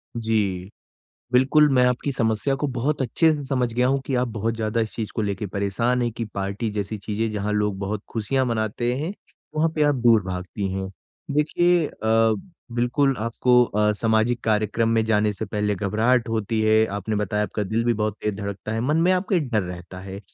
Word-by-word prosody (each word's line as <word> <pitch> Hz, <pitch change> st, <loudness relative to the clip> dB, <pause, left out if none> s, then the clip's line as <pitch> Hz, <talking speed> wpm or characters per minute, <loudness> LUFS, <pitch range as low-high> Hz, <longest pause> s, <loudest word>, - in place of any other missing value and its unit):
जी. 105 Hz, -5 st, -1 dB, 0.6 s
बिल्कुल 145 Hz, +4 st, +5 dB
मैं 125 Hz, 0 st, +5 dB
आपकी 125 Hz, +3 st, 0 dB
समस्या 115 Hz, +3 st, 0 dB
को 145 Hz, +2 st, -2 dB
बहुत 140 Hz, +5 st, 0 dB
अच्छे 160 Hz, +6 st, +3 dB
से 145 Hz, -2 st, -5 dB
समझ 125 Hz, -3 st, -1 dB
गया 125 Hz, +2 st, +2 dB
हूँ 135 Hz, +1 st, +1 dB
कि 135 Hz, -, -1 dB
आप 125 Hz, 0 st, +1 dB
बहुत 115 Hz, 0 st, -2 dB
ज़्यादा 110 Hz, 0 st, -1 dB
इस 110 Hz, -, -3 dB
चीज़ 110 Hz, -2 st, -3 dB
को 110 Hz, -, -1 dB
लेके 100 Hz, 0 st, -2 dB
परेशान 100 Hz, +6 st, 0 dB
है 120 Hz, -, 0 dB
की 115 Hz, -, -2 dB
पार्टी 100 Hz, +3 st, -2 dB
जैसी 105 Hz, 0 st, -3 dB
चीज़ें 110 Hz, +2 st, -2 dB
जहाँ 105 Hz, 0 st, -2 dB
लोग 105 Hz, -2 st, 0 dB
बहुत 100 Hz, +1 st, -3 dB
खुशियाँ 125 Hz, +4 st, 0 dB
मनाते 115 Hz, +1 st, -1 dB
हैं 160 Hz, +7 st, -3 dB, 0.4 s
वहाँ 155 Hz, +1 st, +2 dB
पे 155 Hz, -, +1 dB
आप 145 Hz, -1 st, +3 dB
दूर 115 Hz, -4 st, +4 dB
भागती 95 Hz, +2 st, -4 dB
हैं। 95 Hz, 0 st, -3 dB, 0.5 s
देखिए 170 Hz, +2 st, +3 dB
अ, 110 Hz, -1 st, +2 dB, 0.4 s
बिल्कुल 130 Hz, +3 st, +1 dB
आपको 125 Hz, +2 st, +3 dB
अ, 105 Hz, -2 st, +1 dB
सामाजिक 110 Hz, +2 st, +1 dB
कार्यक्रम 110 Hz, +1 st, +1 dB
में 115 Hz, -1 st, +2 dB
जाने 105 Hz, -1 st, +2 dB
से 110 Hz, -, -5 dB
पहले 105 Hz, 0 st, -1 dB
घबराहट 110 Hz, +5 st, +1 dB
होती 110 Hz, 0 st, -1 dB
है। 110 Hz, 0 st, +4 dB
आपने 105 Hz, +2 st, -2 dB
बताया 105 Hz, 0 st, 0 dB
आपका 105 Hz, 0 st, -2 dB
दिल 110 Hz, +4 st, -1 dB
भी 120 Hz, -, +3 dB
बहुत 105 Hz, -1 st, -1 dB
तेज़ 105 Hz, -1 st, -1 dB
धड़कता 100 Hz, +1 st, -5 dB
है। 115 Hz, -, -1 dB
मन 150 Hz, +6 st, +1 dB
में 180 Hz, -, +4 dB
आपके 185 Hz, 0 st, +1 dB
डर 120 Hz, -8 st, 0 dB
रहता 90 Hz, 0 st, -8 dB
है। 95 Hz, +1 st, -8 dB
110 Hz, 200 wpm, -23 LUFS, 105-125 Hz, 0.6 s, बिल्कुल